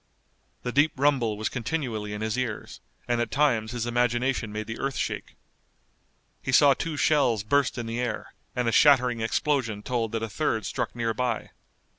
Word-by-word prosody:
The 125 - -2
deep 145 +4 +3
rumble 130 -6 +2
was 110 - -1
continually 120 -5 -3
in 105 0 -5
his 110 +1 -1
ears, 125 -4 -4 0.3
and 120 -1 +1
at 120 - -1
times 120 -7 +1
his 120 -2 -3
imagination 120 -1 0
made 110 +1 -4
the 115 +1 -6
earth 135 -1 -2
shake. - - -3 1.1
He 130 - -3
saw 140 +1 +7
two 160 +2 -4
shells 135 -9 +3
burst 140 +4 +1
in 120 - -3
the 115 +1 -3
air, 120 -3 -3 0.2
and 125 -1 0
a - - +3
shattering 125 -3 +5
explosion 115 -3 0
told 115 -3 -1
that 115 -1 -1
a - - -1
third 110 -2 -1
struck - - -3
near 115 -1 -1
by. 120 -1 -2
120 Hz, 180 wpm, -26 LUFS, 110-135 Hz, 1.1 s, saw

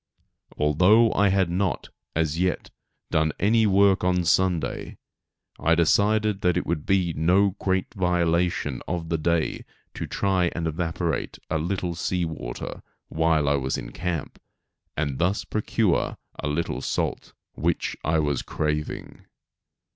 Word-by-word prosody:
Although 90 +10 +4
I 100 - +3
had 95 -2 +2
not, 95 0 -1 0.3
as 80 0 0
yet, 90 -1 -1 0.4
done 80 -1 +2
any 110 +2 +3
work 100 -1 +4
on 90 -1 +2
Sunday, 90 -1 0 0.6
I 85 +1 +3
decided 105 +4 +2
that 90 -4 +2
it - - -1
would 80 -3 -2
be 95 -3 +2
no 95 +6 +3
great 95 -1 -1
violation 85 -6 0
of 85 -2 -3
the 80 -1 0
day 85 0 0 0.3
to - - -5
try 95 -3 +1
to 85 -1 -3
evaporate 80 +1 -2
a 80 - +1
little 90 +1 -2
sea 90 +1 -1
water, 80 -7 -6 0.3
while 80 -2 +2
I 70 0 +3
was 65 -1 -1
in - - -7
camp, 85 +1 -4 0.6
and 70 -3 -1
thus 90 +5 +1
procure 105 -2 0 0.2
a - - -3
little 75 +3 -2
salt, - - -2 0.2
which 85 +1 -1
I 80 +1 +1
was 75 -4 0
craving. 75 0 -4
85 Hz, 140 wpm, -25 LUFS, 80-95 Hz, 0.6 s, Although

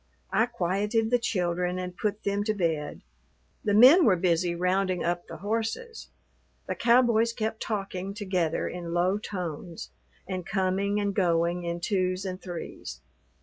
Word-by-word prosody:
I 220 +5 +3
quieted 210 +1 0
the 245 - +4
children 180 -4 -1
and 180 -1 -5
put 210 0 -2
them 200 0 0
to 215 0 0
bed. 160 -6 -2 0.6
The 205 -1 +2
men 265 - +8
were 205 -10 +5
busy 170 0 +1
rounding 185 0 0
up 175 0 -1
the - - -8
horses. 225 - -3 0.6
The - - -2
cowboys 235 -1 +3
kept 220 -1 -3
talking 195 -2 -3
together 185 -6 -1
in 170 -1 -5
low 185 +4 +2
tones 175 -5 -6 0.4
and 185 -1 -3
coming 195 +2 0
and 200 -1 0
going 175 -2 +1
in 170 0 -3
twos 185 0 0
and 185 0 -5
threes. 165 - -7
190 Hz, 145 wpm, -27 LUFS, 175-215 Hz, 0.6 s, men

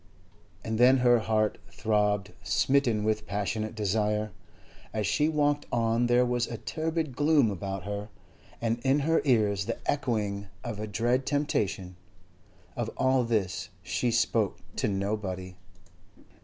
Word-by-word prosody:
And 110 0 -2
then 130 +2 +7
her 120 -1 +5
heart 110 -1 0
throbbed, 105 -3 0
smitten 115 +3 +2
with 110 0 0
passionate 110 +2 -2
desire. 105 0 0 0.6
As 105 -1 0
she 150 - +2
walked 145 -1 +1
on 115 0 +2
there 120 +1 +4
was 120 -1 0
a 115 - -5
turbid 160 0 -3
gloom 145 -6 +4
about 95 0 -4
her, 105 +1 -5 0.5
and 115 0 0
in 135 +4 +2
her 165 +3 +2
ears 105 -6 +2
the 115 - -2
echoing 105 -7 -1 0.2
of 110 -3 -5
a 110 - -3
dread 120 +5 0
temptation. 100 - -1 0.8
Of - - -2
all 130 -1 +3
this 95 -7 -1
she 90 +7 0
spoke 115 - +1 0.2
to - - +1
nobody. 95 -2 -3
110 Hz, 135 wpm, -28 LUFS, 100-125 Hz, 0.8 s, then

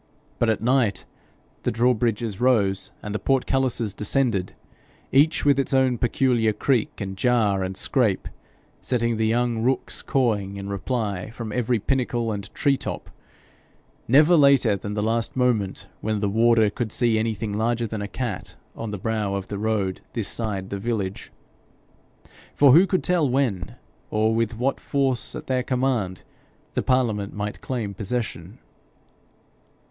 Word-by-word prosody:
But 120 - +2
at 110 0 0
night 120 -5 +1 0.6
the - - 0
drawbridges 115 -2 0
rose 100 -7 +2
and 105 - -5
the 105 - -2
portcullises 130 -3 0
descended 105 -3 0 0.6
each 145 +4 +3
with 140 -1 +4
its 135 0 0
own 130 -3 +2
peculiar 120 -3 +2
creak, 120 +2 0
and 95 -1 -4
jar, 105 -2 +2
and 95 +1 -4
scrape, 110 -7 +1 0.5
setting 120 -2 0
the 110 0 +1
young 120 0 +1
rooks 130 +3 -1
cawing 105 -7 0
in 100 0 -6
reply 100 -2 -2
from 115 -1 -7
every 120 +1 +1
pinnacle 120 -1 -1
and 100 -2 -5
tree 140 -1 +2
top - - -6 1.0
never 150 +8 +6
later 140 -8 +5
than 100 +1 -5
the 105 - -1
last 115 +1 -1
moment 120 -7 0
when 110 -1 -1
the 100 -1 0
warder 115 0 +4
could 115 -1 -3
see 115 -2 +2
anything 110 -1 -2
larger 115 +2 0
than 110 -1 -4
a 100 - -3
cat 110 -3 -5 0.2
on 115 - -5
the 105 - -4
brow 105 -1 -1
of 95 -1 -5
the 100 - -4
road 105 -4 -1
this 110 -5 -2
side 100 -4 -2
the 100 - -3
village. 100 -3 -3 1.2
For 140 -2 +6
who 170 +8 +7
could 185 - 0
tell 170 -6 +2
when, 125 -8 -1 0.3
or 110 +1 +1
with 115 -1 -1
what 130 +4 0
force 135 -3 -1
at - - -7
their 130 -1 0
command, 125 -8 -1 0.5
the - - 0
parliament 110 -6 0
might 105 0 -4
claim 115 -6 -3
possession? 105 -2 -4
115 Hz, 150 wpm, -24 LUFS, 105-125 Hz, 1.2 s, who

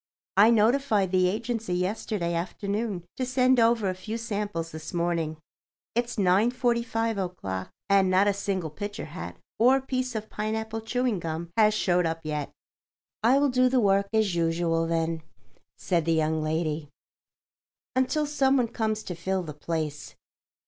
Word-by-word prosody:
I 205 +3 +7
notified 225 -3 +3
the 185 -1 +4
agency 225 -1 -2
yesterday 180 -1 -1
afternoon 200 +3 -2
to 260 - -1
send 255 0 +3
over 230 -2 +3
a 185 - 0
few 200 +5 -5
samples 205 -7 -3
this 160 +2 -7
morning. 170 -2 -1 0.6
It's 240 +1 -1
9.45 225 +2 +1
o'clock, 95 - -5 0.2
and 195 -1 +4
not 190 +2 +4
a 205 - +3
single 190 -5 -2
picture 205 +6 -5
hat 85 - -8 0.2
or 255 +4 +5
piece 255 -2 -3
of 215 0 -3
pineapple 220 +1 -3
chewing 245 -2 0
gum 165 +1 -4
has 215 -1 +4
showed 180 -4 +2
up 165 0 -3
yet." 150 -2 -3 0.7
"I 240 +5 +5
will 285 0 +3
do 255 0 +3
the 255 0 +3
work 200 -2 +3
as 220 -4 +2
usual, 165 0 +1
then," 165 0 -1 0.6
said 170 -4 0
the 165 - +2
young 160 0 +1
lady, 155 -1 -2 1.1
"until 260 +4 +1
some 275 -2 +2
one 240 -3 +1
comes 215 -2 -1
to 180 - -5
fill 185 +2 -2
the 155 -3 -7
place." 150 -1 -4
200 Hz, 155 wpm, -27 LUFS, 165-230 Hz, 1.1 s, I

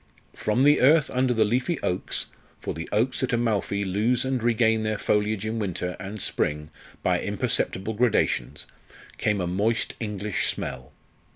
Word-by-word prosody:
From 110 +5 +1
the 145 +1 +5
earth 150 +3 +5
under 130 0 +1
the 110 -2 +3
leafy 125 +9 0
oaks 90 - -1 0.3
for - - -4
the 80 +1 -6
oaks 120 +5 +1
at 130 - 0
Amalfi 105 -4 0
lose 110 +7 +1
and 130 -2 -1
regain 115 -1 +3
their 110 0 -1
foliage 105 0 0
in 110 +1 -2
winter 90 -3 -3
and 105 +2 -6
spring 75 -3 -2 0.3
by - - +2
imperceptible 95 +4 -1
gradations 110 - +1 0.5
came 105 -1 +1
a 90 - 0
moist 110 +8 0
English 105 -2 -2
smell. 65 0 -4
110 Hz, 155 wpm, -25 LUFS, 100-120 Hz, 0.5 s, the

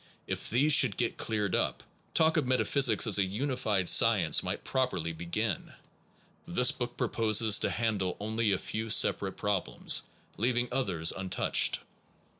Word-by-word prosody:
If - - -4
these 140 +6 +2
should 130 -8 +4
get 120 -2 -2
cleared 105 -3 -2
up, - - -2 0.3
talk 160 0 +3
of 150 -6 0
met 130 0 +1
aphysics 140 -3 +3
as 105 -3 +3
a - - +3
unified 105 -2 -2
science - - +4
might - - -5
properly 125 -11 -2
be 85 +1 -10
gin. 105 +1 -3 0.7
This 125 +8 +3
book 120 0 -6
proposes 110 -1 +2
to - - 0
handle 105 -6 -2
only 110 +1 -2
a 95 - +1
few 110 +4 -5
separate 100 -3 +2
problems, 100 -3 0 0.4
leaving 120 +1 -1
others 95 -11 0
untouched. 95 -1 0
110 Hz, 150 wpm, -29 LUFS, 95-125 Hz, 0.7 s, should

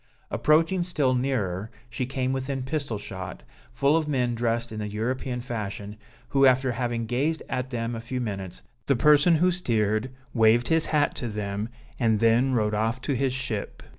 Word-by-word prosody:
Approaching 165 +4 +3
still 150 -7 +1
nearer, 110 -7 -1 0.2
she 120 +1 -3
came 130 -1 -1
within 135 0 -2
pistol 140 -4 -2
shot, 95 -8 -7 0.3
full 140 +2 +2
of 160 -2 +1
men 125 -4 +1
dressed 115 0 -1
in 110 - -5
the 105 - -3
European 125 +4 -2
fashion, 105 -3 -5 0.3
who 135 -1 +5
after 130 0 +3
having 120 -1 -2
gazed 140 +8 -1
at 125 0 -3
them 120 -2 -3
a 115 - -4
few 125 +3 -4
minutes, 100 -6 -5 0.2
the 140 - +4
person 150 +7 +5
who 180 +3 +3
steered, 110 - +1 0.2
waved 115 +1 +4
his 160 0 +3
hat 150 -2 +2
to 120 - -2
them 105 0 -3 0.3
and 110 -4 +2
then 115 +4 +3
rowed 105 -2 +1
off 110 +4 0
to 140 +1 -1
his 135 +1 +1
ship. 130 -6 -3
120 Hz, 175 wpm, -26 LUFS, 110-135 Hz, 0.3 s, who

